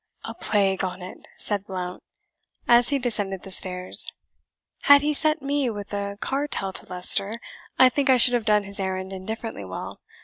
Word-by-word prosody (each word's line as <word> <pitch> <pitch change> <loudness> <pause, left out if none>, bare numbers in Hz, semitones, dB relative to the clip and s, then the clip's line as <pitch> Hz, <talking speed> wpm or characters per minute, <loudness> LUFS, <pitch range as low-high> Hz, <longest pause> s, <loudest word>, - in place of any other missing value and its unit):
"A - - -6
plague 195 -2 +1
on 185 -1 -4
it!" 185 - -9 0.2
said 205 -2 +1
Blount, 180 -2 -5 0.7
as 240 0 +5
he 285 - +2
descended 205 -7 -2
the 190 - -10
stairs; 185 -1 -3 0.7
"had 285 0 +8
he 300 +1 +1
sent 310 0 0
me 280 -2 0
with 205 -2 -7
a 200 0 -3
cartel 270 -9 0
to - - -4
Leicester 195 +4 0 0.4
I 260 - +8
think 275 +1 0
I 260 - +6
should 245 +1 +7
have 240 -2 +1
done 210 -1 +3
his 200 0 -5
errand 190 0 -3
indifferently 220 - -6
well. 95 -1 -7
205 Hz, 175 wpm, -24 LUFS, 190-250 Hz, 0.7 s, had